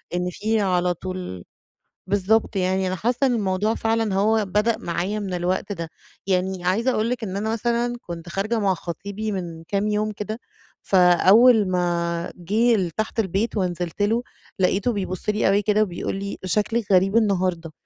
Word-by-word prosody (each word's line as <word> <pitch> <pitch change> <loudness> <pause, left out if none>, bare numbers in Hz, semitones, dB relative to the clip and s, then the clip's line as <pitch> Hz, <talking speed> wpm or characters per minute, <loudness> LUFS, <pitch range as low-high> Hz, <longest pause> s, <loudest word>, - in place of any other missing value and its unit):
إن 180 0 -1
في 215 +3 0
على 180 -2 +1
طول 180 - -6 0.6
بالضبط، 205 +3 +1
يعني 190 0 +1
أنا 185 - -1
حاسّة 245 +8 +1
إن 245 - +1
الموضوع 205 +1 0
فعلًا 225 -3 0
هو 215 +1 +2
بدأ 210 +4 +1
معايا 180 +5 -2
من 195 -3 -4
الوقت 185 +3 -1
ده، 165 -4 -5 0.4
يعني 185 -1 0
عايزة 225 +8 +2
أقول 225 -1 0
لِك 250 -2 -2
إن 195 -2 -3
أنا 220 +2 -1
مثلًا 240 +1 0
كنت 170 -1 -8
خارجة 215 +5 -1
مع 195 -2 +2
خطيبي 200 +5 -5
من 170 -4 -5
كام 200 +1 0
يوم 210 0 0
كده، 210 +2 -5 0.4
فأول 195 +5 +5
ما 170 -1 -1
جه 220 +7 +2
لتحت 215 +4 -2
البيت 210 +3 0
ونزلت 180 -1 -2
له، 225 +4 +2 0.4
لقيته 195 +5 +2
بيبص 185 -1 -3
لي 210 0 +2
أوي 200 +1 +3
كده 210 +1 +2
وبيقول 180 -1 -4
لي: 200 0 -5
"شكلِك 210 +3 0
غريب 195 +3 +4
النهارده"، 185 -6 0
195 Hz, 165 wpm, -23 LUFS, 180-215 Hz, 0.6 s, فأول